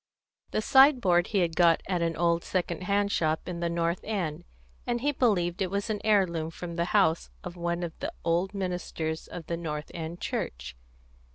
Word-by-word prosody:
The 215 Hz, -, -1 dB
sideboard 245 Hz, -12 st, +5 dB
he 200 Hz, -3 st, +1 dB
had 165 Hz, -2 st, 0 dB
got 170 Hz, -1 st, +4 dB
at 180 Hz, -2 st, 0 dB
an 165 Hz, -1 st, 0 dB
old 170 Hz, 0 st, +2 dB
second 180 Hz, -1 st, -2 dB
hand 200 Hz, +1 st, +1 dB
shop 155 Hz, -3 st, 0 dB
in 175 Hz, -2 st, -4 dB
the 170 Hz, 0 st, 0 dB
North 170 Hz, +1 st, 0 dB
End; 175 Hz, -6 st, -3 dB, 0.4 s
and 240 Hz, -1 st, 0 dB
he 290 Hz, +3 st, +2 dB
believed 195 Hz, -9 st, +1 dB
it 190 Hz, -, +1 dB
was 200 Hz, +3 st, -2 dB
an 210 Hz, -, -3 dB
heirloom 180 Hz, -7 st, +2 dB
from 170 Hz, +1 st, -7 dB
the 170 Hz, 0 st, 0 dB
house 175 Hz, -4 st, +2 dB
of 180 Hz, -1 st, -7 dB
one 170 Hz, 0 st, -2 dB
of 170 Hz, -2 st, -4 dB
the 290 Hz, +4 st, -3 dB
old 175 Hz, +4 st, +1 dB
ministers 175 Hz, -4 st, -3 dB
of 170 Hz, -3 st, -8 dB
the 170 Hz, +2 st, -3 dB
North 150 Hz, -3 st, -5 dB
End 165 Hz, +1 st, -5 dB
Church. 60 Hz, 0 st, -4 dB
175 Hz, 190 wpm, -28 LUFS, 165-195 Hz, 0.4 s, sideboard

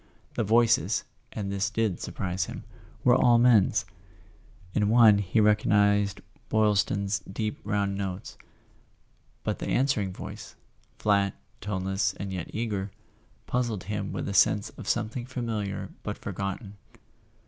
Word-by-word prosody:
The -, -, 0 dB
voices 115 Hz, -2 st, +3 dB, 0.3 s
(and 100 Hz, -2 st, -4 dB
this 100 Hz, +1 st, 0 dB
did 110 Hz, -4 st, -1 dB
surprise 90 Hz, -1 st, -2 dB
him) -, -, -8 dB, 0.4 s
were 125 Hz, -, +6 dB
all 120 Hz, -1 st, +5 dB
men's. 115 Hz, -7 st, +4 dB, 0.9 s
In 105 Hz, -1 st, +2 dB
one 110 Hz, -3 st, +7 dB
he 100 Hz, +2 st, +1 dB
recognized 105 Hz, -1 st, +3 dB, 0.3 s
Boy 110 Hz, -1 st, +3 dB
Is 100 Hz, -1 st, +3 dB
ton's 100 Hz, 0 st, -1 dB
deep 105 Hz, +1 st, -3 dB
round 100 Hz, -1 st, 0 dB
notes; 95 Hz, -1 st, -5 dB, 1.1 s
but -, -, -2 dB
the -, -, -4 dB
answering 125 Hz, -7 st, +1 dB
voice, -, -, -9 dB, 0.4 s
flat, 100 Hz, -2 st, +2 dB, 0.3 s
toneless 95 Hz, -1 st, -1 dB
and 100 Hz, -1 st, -5 dB
yet 90 Hz, -3 st, -4 dB
eager, 105 Hz, -3 st, -2 dB, 0.6 s
puzzled 120 Hz, -6 st, -1 dB
him 105 Hz, 0 st, -3 dB
with -, -, -4 dB
a 100 Hz, -, -3 dB
sense 105 Hz, +2 st, +3 dB
of -, -, -8 dB
something 120 Hz, +3 st, -1 dB
familiar 115 Hz, -6 st, -3 dB
but -, -, -4 dB
forgotten. 100 Hz, +1 st, -5 dB
105 Hz, 135 wpm, -27 LUFS, 100-110 Hz, 1.1 s, one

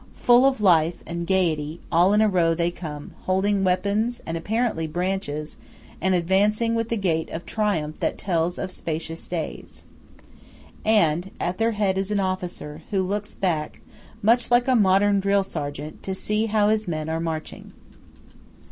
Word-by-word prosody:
Full 245 Hz, +2 st, +5 dB
of 265 Hz, -5 st, 0 dB
life 170 Hz, -4 st, +3 dB
and 170 Hz, 0 st, -4 dB
gaiety 165 Hz, -4 st, 0 dB
all 175 Hz, +3 st, +4 dB
in 210 Hz, +1 st, +4 dB
a 220 Hz, -, +5 dB
row 170 Hz, -4 st, +2 dB
they 170 Hz, +1 st, 0 dB
come, 150 Hz, -4 st, -8 dB
holding 195 Hz, +1 st, +1 dB
weapons, 200 Hz, +6 st, +1 dB
and, 165 Hz, -, -3 dB
apparently, 210 Hz, -1 st, -1 dB
branches, 165 Hz, -3 st, -3 dB, 0.4 s
and 190 Hz, +2 st, +2 dB
advancing 205 Hz, +6 st, +2 dB
with 230 Hz, 0 st, -1 dB
a -, -, +2 dB
gait 170 Hz, -6 st, 0 dB
of 165 Hz, -, -6 dB
triumph 170 Hz, -9 st, -1 dB
that -, -, -1 dB
tells 175 Hz, -1 st, -1 dB
of 185 Hz, -, -4 dB
"spacious 165 Hz, -1 st, -4 dB
days." 170 Hz, -3 st, -6 dB, 1.0 s
And 190 Hz, -5 st, +2 dB
at 175 Hz, +1 st, -2 dB
their 225 Hz, 0 st, +2 dB
head 195 Hz, -2 st, +1 dB
is 195 Hz, +1 st, -2 dB
an 210 Hz, -1 st, 0 dB
officer, 180 Hz, -5 st, -4 dB
who 195 Hz, -2 st, +1 dB
looks 205 Hz, +3 st, -3 dB
back, 160 Hz, -5 st, -2 dB, 0.4 s
much 230 Hz, +3 st, +3 dB
like 245 Hz, +1 st, +3 dB
a 260 Hz, -, +4 dB
modern 200 Hz, -1 st, +4 dB
drill 200 Hz, 0 st, +2 dB
sergeant, 150 Hz, -3 st, -6 dB
to 190 Hz, -, -4 dB
see 210 Hz, +3 st, 0 dB
how 210 Hz, -1 st, +2 dB
his 215 Hz, -1 st, +1 dB
men 155 Hz, -2 st, -3 dB
are 160 Hz, 0 st, -1 dB
marching. 160 Hz, -1 st, -5 dB
185 Hz, 165 wpm, -24 LUFS, 165-210 Hz, 1.0 s, Full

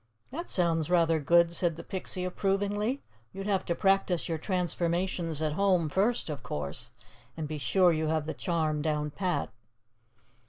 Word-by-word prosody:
'" 110 Hz, -, -41 dB
"That 335 Hz, +6 st, -5 dB
sounds 165 Hz, -3 st, +1 dB
rather 165 Hz, -2 st, +3 dB
good," 170 Hz, +3 st, +4 dB
said 170 Hz, -2 st, +1 dB
the 170 Hz, -, -8 dB
Pixie 185 Hz, -1 st, -4 dB
approvingly. 205 Hz, +7 st, 0 dB, 0.3 s
"You'd 195 Hz, 0 st, -6 dB
have 200 Hz, -2 st, +1 dB
to 170 Hz, -, 0 dB
practice 195 Hz, -2 st, +2 dB
your 165 Hz, -1 st, -2 dB
transformations 175 Hz, -2 st, -1 dB
at 155 Hz, -1 st, 0 dB
home, 180 Hz, -3 st, +2 dB
first, 205 Hz, +9 st, +1 dB
of 145 Hz, -4 st, -4 dB
course, 75 Hz, -8 st, -5 dB, 0.5 s
and 155 Hz, -2 st, -3 dB
be 155 Hz, 0 st, -4 dB
sure 175 Hz, +8 st, +4 dB
you 155 Hz, 0 st, 0 dB
have 155 Hz, -1 st, 0 dB
the 160 Hz, -, -3 dB
charm 155 Hz, -3 st, -1 dB
down 150 Hz, -1 st, -1 dB
pat." 185 Hz, +2 st, -1 dB
170 Hz, 165 wpm, -29 LUFS, 155-190 Hz, 0.5 s, good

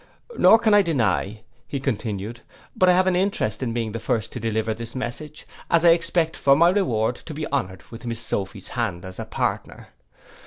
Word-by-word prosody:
'Nor 225 Hz, -, +7 dB
can 220 Hz, -2 st, +2 dB
I 205 Hz, -, +7 dB
deny,' 110 Hz, -, 0 dB, 0.3 s
continued 115 Hz, -5 st, -3 dB
he, -, -, -23 dB, 0.3 s
'but 185 Hz, -, +4 dB
I -, -, +7 dB
have 185 Hz, +1 st, +3 dB
an 185 Hz, -1 st, +2 dB
interest 180 Hz, -, 0 dB
in 125 Hz, -3 st, -1 dB
being 115 Hz, -2 st, -3 dB
first 115 Hz, -1 st, -2 dB
to 125 Hz, -, -6 dB
deliver 110 Hz, 0 st, -1 dB
this 115 Hz, +2 st, -7 dB
message, 140 Hz, +4 st, -5 dB, 0.2 s
as 170 Hz, 0 st, +3 dB
I 170 Hz, -, +8 dB
expect 170 Hz, -1 st, +1 dB
for 140 Hz, 0 st, +4 dB
my 170 Hz, +4 st, +5 dB
reward 125 Hz, -, +1 dB
to 155 Hz, -, -9 dB
be 155 Hz, +1 st, -3 dB
honoured 95 Hz, -10 st, -2 dB
with 120 Hz, +1 st, -9 dB
miss 115 Hz, -1 st, -2 dB
Sophy's 100 Hz, -3 st, -3 dB
hand 100 Hz, -8 st, -3 dB
as 95 Hz, 0 st, -9 dB
a -, -, -4 dB
partner. -, -, -3 dB
120 Hz, 195 wpm, -23 LUFS, 110-165 Hz, 0.3 s, I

